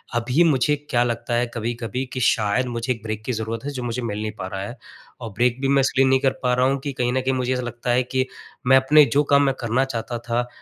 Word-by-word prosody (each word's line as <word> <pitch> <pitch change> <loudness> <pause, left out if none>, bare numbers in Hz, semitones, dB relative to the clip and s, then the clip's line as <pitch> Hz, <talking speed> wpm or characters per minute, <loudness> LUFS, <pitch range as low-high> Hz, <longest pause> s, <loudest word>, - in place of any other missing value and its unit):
अभी 125 +8 +2
मुझे 150 -2 +3 0.2
क्या 120 -2 +3
लगता 120 0 -3
है 120 +1 +2
कभी-कभी 120 +2 -3
कि 130 - -3
शायद 110 +1 +2
मुझे 120 +1 -3
एक 115 - -13
ब्रेक 110 -1 -4
की 125 - -1
ज़रूरत 110 +1 -3
है 145 - -3
जो 130 -3 -5
मुझे 120 +1 -3
मिल 105 -2 -3
नहीं 110 0 -3
पा 95 - -4
रहा 95 +1 -5
है। 120 +6 -7 0.4
और 115 - -5
ब्रेक 120 +4 +1
भी 135 - +1
मैं 140 0 +4
इसलिए 135 0 +2
नहीं 130 0 +4
कर 135 -1 +3
पा 125 0 +2
रहा 125 +1 +2
हूँ 135 0 0
कि 140 -2 -3
कहीं 125 -1 -1
न 130 - +1
कहीं 130 +1 0
मुझे 130 0 0
ऐसा 125 - -1
लगता 120 0 -3
है 125 +1 +3
कि 130 +1 -1 0.4
मैं 130 0 +7
अपने 145 +3 +6
जो 145 - +5
काम 140 0 +6
मैं 135 -1 +1
करना 120 +3 +1
चाहता 120 -2 -4
था, 120 +1 -2
125 Hz, 270 wpm, -22 LUFS, 115-130 Hz, 0.4 s, मैं